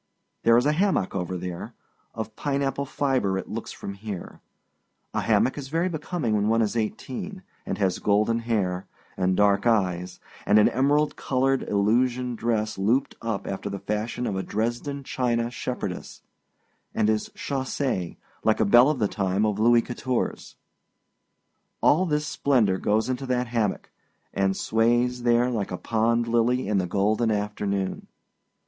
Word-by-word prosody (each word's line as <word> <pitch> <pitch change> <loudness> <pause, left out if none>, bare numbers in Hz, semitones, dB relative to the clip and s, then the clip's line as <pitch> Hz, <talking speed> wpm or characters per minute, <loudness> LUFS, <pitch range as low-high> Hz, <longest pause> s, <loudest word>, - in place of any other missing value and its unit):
There 115 0 +5
is 120 - +3
a 150 - +4
hammock 180 - +1
over 90 -1 -2
there 90 -1 -6 0.4
of 110 -1 -5
pineapple 140 -1 -1
fibre, 130 -10 0
it - - -5
looks - - -5
from 100 - -7
here. 100 -2 -7 0.7
A - - 0
hammock 130 - +2
is 135 - -6
very 165 +6 0
becoming 155 -6 -2
when 105 0 +1
one 115 +1 +3
is 110 - -2
eighteen, 160 - -4 0.2
and - - -2
has 95 -3 0
golden 105 +3 +2
hair, 100 -6 -1 0.3
and 95 0 +1
dark 105 +2 +3
eyes, 90 -5 0 0.2
and 105 - +4
an 105 - +6
emerald 145 +4 +2
colored 135 0 +1
illusion 120 +5 +1
dress 110 -3 -1
looped 115 +8 +1
up 115 -3 -3
after 95 +1 -4
the 100 - -4
fashion 105 +5 -3
of 100 - -2
a 95 - -1
Dresden 120 +8 -3
china 120 -2 -1
shepherdess, 120 -7 -5 0.7
and 110 - +2
is 110 -1 0
chaussee 130 -8 -2 0.3
like 110 - +2
a - - +3
belle 120 +7 +7
of 150 - 0
the 105 -4 +1
time 100 +1 0
of 105 -1 -1
Louis 120 +1 +5
Quatorze. 125 0 -3 1.2
All 180 +5 +4
this 150 -1 0
splendor 125 -10 +2
goes 110 +2 +1
into 130 +1 -3
that 125 0 +1
hammock, 115 -4 -1 0.4
and 95 -1 +1
sways 120 +2 +1
there 120 +1 +3
like 105 -5 -2
a 90 - -4
pond 115 +2 +1
lily 120 +1 +2
in 105 -1 +2
the 90 - -1
golden 105 +5 +1
afternoon. 105 -2 -2
115 Hz, 155 wpm, -25 LUFS, 100-130 Hz, 1.2 s, belle